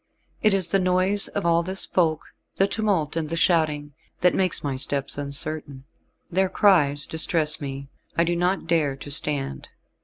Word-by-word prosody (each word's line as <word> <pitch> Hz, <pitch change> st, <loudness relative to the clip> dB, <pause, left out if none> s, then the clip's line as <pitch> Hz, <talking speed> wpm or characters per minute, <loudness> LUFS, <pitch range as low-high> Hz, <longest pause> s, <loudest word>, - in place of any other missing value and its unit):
It 210 Hz, -2 st, +4 dB
is 180 Hz, -3 st, 0 dB
the 195 Hz, -, +3 dB
noise 185 Hz, +2 st, +2 dB
of 200 Hz, -, -4 dB
all 170 Hz, 0 st, +3 dB
this 190 Hz, +3 st, 0 dB
folk 160 Hz, -4 st, 0 dB, 0.2 s
the 195 Hz, -, +3 dB
tumult 195 Hz, -8 st, -1 dB
and 160 Hz, -2 st, -2 dB
the 165 Hz, -, -2 dB
shouting 155 Hz, -4 st, +1 dB, 0.3 s
that 180 Hz, -1 st, +4 dB
makes 185 Hz, -2 st, +1 dB
my 140 Hz, -2 st, -2 dB
steps 140 Hz, +1 st, -3 dB
uncertain. 140 Hz, -1 st, -3 dB, 0.5 s
Their 190 Hz, +2 st, +1 dB
cries 145 Hz, -10 st, +3 dB
distress 160 Hz, -1 st, 0 dB
me, 140 Hz, -1 st, -6 dB, 0.3 s
I 170 Hz, -, +4 dB
do 170 Hz, +1 st, 0 dB
not 180 Hz, +3 st, 0 dB
dare 160 Hz, -5 st, +1 dB
to 145 Hz, +1 st, -8 dB
stand." 140 Hz, -, -3 dB
165 Hz, 165 wpm, -24 LUFS, 145-185 Hz, 0.5 s, It